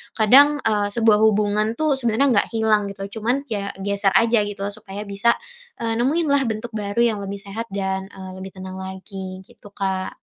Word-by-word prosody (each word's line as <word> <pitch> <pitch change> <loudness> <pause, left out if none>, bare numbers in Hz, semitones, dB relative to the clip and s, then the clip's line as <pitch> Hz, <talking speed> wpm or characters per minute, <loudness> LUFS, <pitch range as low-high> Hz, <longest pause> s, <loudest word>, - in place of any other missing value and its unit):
Kadang, 280 +7 +6
eee, 210 -2 +1
sebuah 225 -3 +4
hubungan 215 0 +2
tuh 295 -1 +1
sebenarnya 240 +2 +2
nggak - - -1
hilang 215 -2 +2
gitu, 200 +2 -7
cuman, 245 +6 0
ya 200 -2 -2
geser 200 -1 +1
aja 230 0 +4
gitu, 205 -1 -6
supaya 200 0 -8
bisa, 200 +4 +2 0.5
eee, 225 0 -1
nemuin 305 +7 +1
lah 280 -1 +4
bentuk 220 +1 -4
baru 205 +1 -3
yang 225 -3 +1
lebih 200 0 -5
sehat 205 +3 -6
dan, 190 -1 -2
eee, 190 -1 -9
lebih 190 0 -8
tenang 185 0 -8
lagi, 190 0 -7
gitu, 205 - -16
Kak. 190 -2 -3
210 Hz, 180 wpm, -22 LUFS, 195-230 Hz, 0.5 s, Kadang